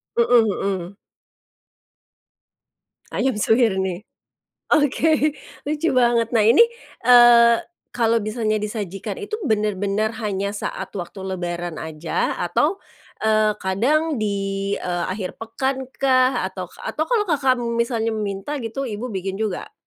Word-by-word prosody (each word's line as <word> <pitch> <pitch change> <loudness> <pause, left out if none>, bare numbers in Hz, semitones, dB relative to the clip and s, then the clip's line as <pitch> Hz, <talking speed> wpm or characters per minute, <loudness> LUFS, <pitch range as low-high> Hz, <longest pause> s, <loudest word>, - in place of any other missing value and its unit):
Mhm 235 -1 +4
mhm. 195 -2 -3 2.2
Ayam 265 -3 0
suwir 220 0 +3
nih. 190 +2 -4 0.7
Oke, 305 +1 +3 0.3
lucu 300 +3 -1
banget, 235 -2 +3
nah 225 -3 +2
ini, 230 +6 +6 0.4
eee, 240 -1 +7 0.3
kalau 230 -1 +1
misalnya 215 0 -1
disajikan 205 -3 -4
itu 425 -2 -8 0.2
bener-bener 210 0 0
hanya 200 -2 -2
saat 205 - -5
waktu 190 0 -7
lebaran 175 -3 -4
aja 160 +1 -2
atau, 295 - +1 0.5
eee, 215 -1 +3
kadang 270 +9 +1
di, 195 -1 -2
eee, 175 -1 -2
akhir 185 0 -5
pekan 265 +4 -3
kah 260 -1 +3
atau - - -7 0.2
atau 315 - -1
kalau 450 -4 +2
Kakak, 275 -7 +2
mmm, 235 -1 -3
misalnya 230 -1 0
minta 210 +6 -3
gitu 230 +4 -4
ibu 235 0 -4
bikin 195 -1 -4
juga? 215 - -3
220 Hz, 120 wpm, -22 LUFS, 195-250 Hz, 2.2 s, eee